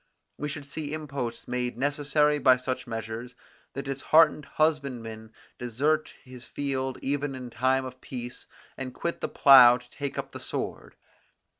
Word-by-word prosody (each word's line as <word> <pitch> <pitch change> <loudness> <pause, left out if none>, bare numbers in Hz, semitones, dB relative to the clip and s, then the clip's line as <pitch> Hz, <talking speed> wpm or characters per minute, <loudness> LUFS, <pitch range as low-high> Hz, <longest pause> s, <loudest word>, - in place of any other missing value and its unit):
We 150 - -4
should 145 -1 -6
see 150 0 -5
imposts 140 -6 -5
made 125 -1 -2
necessary 145 +2 +2
by 130 -3 +6
such 130 0 -4
measures, 115 +2 -6 0.4
the 140 - -4
disheartened 150 +2 +3
husbandman 125 -8 -1 0.3
desert 145 +6 0
his 125 -2 -11
field 135 -2 -3
even 140 0 -1
in 125 -2 -8
time 130 +3 +1
of 130 0 -9
peace, 120 -1 -7 0.3
and 130 -1 -6
quit 170 - -3
the - - -2
plough 125 -3 +8
to 125 0 -17
take 140 -1 -5
up - - -4
the - - -8
sword. - - -5
130 Hz, 150 wpm, -27 LUFS, 125-145 Hz, 0.4 s, plough